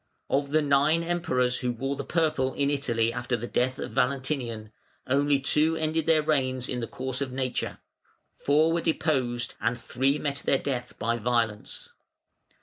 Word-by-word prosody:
Of 140 0 +1
the 155 +1 +2
nine 145 +4 +3
Emperors 130 -8 0
who 125 -1 -1
wore 135 +4 -3
the 140 - -4
purple 150 -6 0
in 140 0 +1
Italy 115 -5 0
after 125 0 -1
the 115 - -5
death 125 +1 0
of - - -5
Valentinian, 125 -5 -1 0.3
only 140 +1 +2
two 150 +4 +2
ended 160 0 -1
their 160 -2 +4
reigns 130 -4 0
in 125 - -3
the 115 - -3
course 130 +1 -3
of 135 -2 -2
nature, 130 -1 -2 0.6
four 155 +3 +2
were 170 - +1
deposed, 130 -8 0
and 120 +1 0
three 135 +4 0
met 145 -2 -2
their 140 - +2
death 125 -3 -4
by 115 +1 0
violence. 115 -2 -1
135 Hz, 165 wpm, -27 LUFS, 125-150 Hz, 0.6 s, their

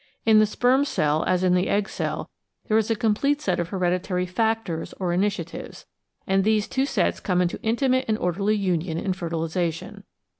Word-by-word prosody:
In 220 -1 +6
the 215 - +4
sperm 250 +5 +2
cell 155 - 0
as 185 0 +1
in 180 -1 +3
the 180 +1 +1
egg 205 0 +1
cell - - -4 0.4
there 215 - +3
is 220 - -1
a 225 - +2
complete 235 +6 +1
set 300 - -1
of 170 -1 -2
hereditary 180 0 -1
''factors" 210 -3 -2
or 180 -2 -1
initiatives, 185 -2 -3 0.4
and 195 0 +2
these 215 0 +2
two 265 +3 0
sets - - 0
come 180 -3 0
into 180 -1 -1
intimate 255 +3 +1
and 215 -1 +1
orderly 195 +4 0
union 180 -4 -1
in 185 +2 -1
fertilisation. 165 -1 -3
195 Hz, 180 wpm, -24 LUFS, 175-220 Hz, 0.4 s, In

